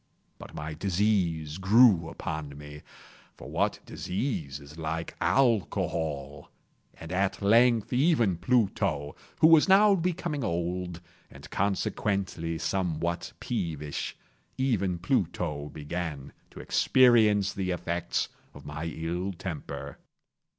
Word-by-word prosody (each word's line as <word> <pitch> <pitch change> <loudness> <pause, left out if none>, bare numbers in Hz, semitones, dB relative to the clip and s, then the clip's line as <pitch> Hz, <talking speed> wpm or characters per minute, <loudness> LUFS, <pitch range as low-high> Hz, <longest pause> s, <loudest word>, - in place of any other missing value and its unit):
But - - -11
my 75 +1 -5
disease 90 -3 0
grew 95 -4 +5
upon 75 -3 -5
me—for 75 0 -14
what - - 0
disease 90 - -3
is 70 +1 -13
like 80 +1 -4
Alcohol!—and 80 - -2
at 95 +1 0
length 115 +2 +4
even 125 - +3
Pluto, 90 - 0 0.3
who 155 - +8
was 165 +2 +6
now 200 +2 +7
becoming 175 -5 -1
old, 85 -2 -2 0.3
and 70 +2 -12
consequently 95 -4 -1
somewhat 85 0 -2
peevish—even 95 - -3
Pluto 85 - -1
began 75 -2 -5 0.2
to - - -12
experience 110 -6 +4
the 95 -1 -3
effects 85 -1 -2 0.3
of - - -12
my 75 +2 -5
ill 85 +4 -3
temper. 85 -3 -6
90 Hz, 100 wpm, -28 LUFS, 80-110 Hz, 0.3 s, who